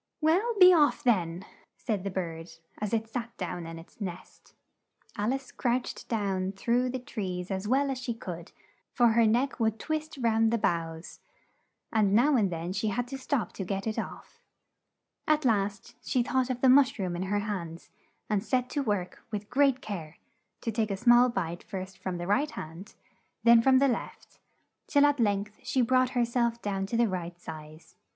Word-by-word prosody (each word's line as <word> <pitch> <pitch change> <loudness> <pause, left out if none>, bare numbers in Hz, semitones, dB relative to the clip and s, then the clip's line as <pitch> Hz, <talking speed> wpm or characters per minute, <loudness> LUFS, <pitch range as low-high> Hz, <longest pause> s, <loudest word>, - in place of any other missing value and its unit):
"Well, 370 +10 +2
be 365 0 +9
off, 300 -4 +3
then!" 180 -7 +1 0.3
said 210 -5 -2
the 200 - -2
bird 170 -3 -4 0.3
as 210 -1 -3
it 225 -1 0
sat 235 0 -5
down 175 -2 -4
in 165 0 -7
its 165 +6 -15
nest. 180 -3 -8 0.6
Al 210 +4 0
ice 270 -1 -4
crouched 245 +1 -2
down 195 -4 -1
through 240 +5 +1
the 260 - -2
trees 190 -7 -5
as 190 +1 -3
well 275 +3 +2
as 260 - -3
she 245 -2 -3
could, 175 -6 -8 0.4
for 240 -2 +4
her 225 0 +4
neck 245 +6 +1
would 220 -1 +1
twist 310 +2 -3
round 225 -2 +3
the 235 - +2
boughs, 165 -4 -2 0.7
and 205 -3 +3
now 275 +6 +4
and 205 -6 +2
then 170 +2 -4
she 205 +3 -1
had 245 +4 -1
to 270 - -5
stop 260 -2 -1
to 195 - -4
get 195 +1 -3
it 220 -1 -2
off. - - -8 0.9
At 305 -1 +2
last, 205 -3 0
she 250 - +1
thought 260 0 0
of 250 -1 -3
the 265 - +5
mush 270 +1 +5
room 185 -4 -2
in 175 - -4
her 205 - +1
hands, 175 -6 -5 0.4
and 210 -2 0
set 250 +1 0
to 290 - 0
work 205 -8 -2
with 210 -1 -5
great 270 0 +3
care, 170 -7 -6 0.4
to 230 - -2
take 220 0 0
a 195 - -2
small 240 +3 +6
bite 175 -6 -3
first 190 -1 -7
from 185 -2 -4
the 175 - -4
right 270 +11 +1
hand, 165 - -9 0.5
then 235 0 +7
from 260 +2 +5
the 275 +1 +4
left, 245 - -5 0.5
till 285 -1 +5
at 290 -1 +2
length 205 -1 0
she 260 - +1
brought 255 +1 +3
her 240 - +4
self 235 0 0
down 195 -3 -2
to 230 - -1
the 235 0 +4
right 175 -2 -5
size. 155 -1 -10
220 Hz, 190 wpm, -29 LUFS, 190-250 Hz, 0.9 s, be